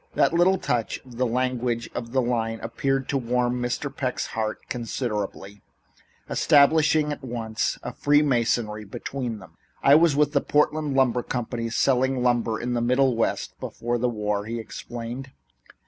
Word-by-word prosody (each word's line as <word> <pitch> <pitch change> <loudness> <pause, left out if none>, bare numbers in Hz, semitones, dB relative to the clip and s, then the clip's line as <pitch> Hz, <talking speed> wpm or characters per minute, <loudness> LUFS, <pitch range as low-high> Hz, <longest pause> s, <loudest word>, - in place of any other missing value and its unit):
That - - +3
little 180 +3 +4
touch 120 -9 -1
of 125 -2 -13
the 125 0 +1
language 125 -1 -1
of 115 -1 -5
the 130 0 +2
line 115 -2 -1
appeared 135 +3 -1
to 140 - +1
warm 125 0 0
Mr. 120 +3 -3
Peck's 130 -2 -2
heart 110 -1 -3
considerably, 105 -5 -4 0.7
establishing 150 +1 +4
at 145 - -6
once 115 -3 -2
a - - -5
free 145 +1 +3
masonry 115 -5 0
between 120 +3 -5
them. 95 - -15 0.3
"I 140 - +7
was 160 -1 +5
with 150 0 +3
the 140 - +3
Portland 150 -1 +1
Lumber 125 -2 +3
Company, 120 -1 -3
selling 130 +1 +2
lumber 120 -2 +1
in 125 +1 -2
the 120 - 0
Middle 125 +1 +3
West 115 - -1
before 120 +1 -3
the 125 +1 +1
war," 105 -2 -2
he 115 +2 -4
explained. 120 +3 -7
125 Hz, 160 wpm, -25 LUFS, 115-135 Hz, 0.7 s, I